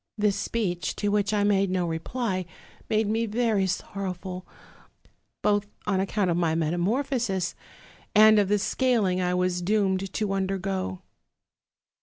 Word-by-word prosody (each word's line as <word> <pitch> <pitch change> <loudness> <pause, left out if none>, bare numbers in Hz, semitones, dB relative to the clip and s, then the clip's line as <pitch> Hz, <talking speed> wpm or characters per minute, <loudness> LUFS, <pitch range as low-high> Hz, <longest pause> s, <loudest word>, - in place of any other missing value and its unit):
"This 210 -2 +2
speech, 200 -4 -2
to 205 - -1
which 205 0 +1
I 210 -1 +2
made 200 -1 +3
no 180 -1 0
reply, 185 +3 -2 0.4
made 215 0 +2
me 225 +2 0
very 215 -3 +1
sorrowful, 185 0 -4 1.0
both 205 0 +2 0.2
on 195 -2 +1
accouut 195 0 0
of 170 -1 +1
my 165 -2 +1
metamorphosis, 190 - 0 0.6
and 215 0 +8
of 200 - +2
the 210 +1 +3
scaling 205 -5 +1
I 180 0 +1
was 180 0 0
doomed 195 -1 +1
to 210 -2 -1
undergo. 190 - -2
195 Hz, 135 wpm, -26 LUFS, 180-210 Hz, 1.0 s, and